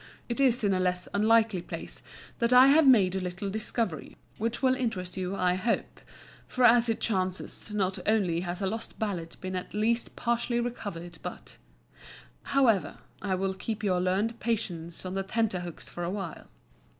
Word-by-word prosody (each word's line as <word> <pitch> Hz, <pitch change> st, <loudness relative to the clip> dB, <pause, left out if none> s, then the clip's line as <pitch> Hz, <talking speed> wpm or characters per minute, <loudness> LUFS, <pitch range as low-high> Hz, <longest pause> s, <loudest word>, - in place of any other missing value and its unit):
It 240 Hz, +2 st, -3 dB
is 255 Hz, -3 st, +3 dB
in 200 Hz, -2 st, +3 dB
a 185 Hz, -, +1 dB
less 180 Hz, 0 st, 0 dB
unlikely 220 Hz, -2 st, +3 dB
place -, -, -6 dB, 0.4 s
that 235 Hz, 0 st, +2 dB
I 255 Hz, +2 st, +8 dB
have 300 Hz, +1 st, +6 dB
made 200 Hz, -8 st, +6 dB
a -, -, 0 dB
little 185 Hz, +2 st, -4 dB
discovery 215 Hz, -, -2 dB, 0.2 s
which 230 Hz, +4 st, -2 dB
will 260 Hz, -1 st, +5 dB
interest 220 Hz, -8 st, -3 dB
you, 185 Hz, +1 st, -3 dB
I 180 Hz, -2 st, +2 dB
hope; 200 Hz, +6 st, -1 dB, 0.5 s
for 255 Hz, -, -1 dB
as 240 Hz, 0 st, +6 dB
it 225 Hz, -, 0 dB
chances, 185 Hz, -1 st, -2 dB
not 195 Hz, -2 st, 0 dB
only 195 Hz, -6 st, +2 dB
has 180 Hz, +2 st, -3 dB
a -, -, +2 dB
lost 225 Hz, +4 st, -4 dB
ballad 180 Hz, -6 st, -3 dB
been 185 Hz, 0 st, -4 dB
at 180 Hz, +2 st, -5 dB
least 230 Hz, +3 st, 0 dB
partially 235 Hz, 0 st, 0 dB
recovered, 175 Hz, -8 st, -5 dB
but... -, -, -8 dB, 1.0 s
however, 220 Hz, -, +3 dB, 0.2 s
I 195 Hz, -2 st, 0 dB
will 190 Hz, +1 st, -1 dB
keep 215 Hz, +3 st, -5 dB
your 185 Hz, -3 st, +2 dB
learned 200 Hz, +6 st, 0 dB
patience 175 Hz, -8 st, -3 dB
on 185 Hz, -, -4 dB
the 195 Hz, -, -1 dB
tenterhooks 190 Hz, -4 st, -2 dB
for 175 Hz, -, -6 dB
a 170 Hz, -, -1 dB
while. 190 Hz, -4 st, -5 dB
200 Hz, 175 wpm, -29 LUFS, 185-230 Hz, 1.0 s, I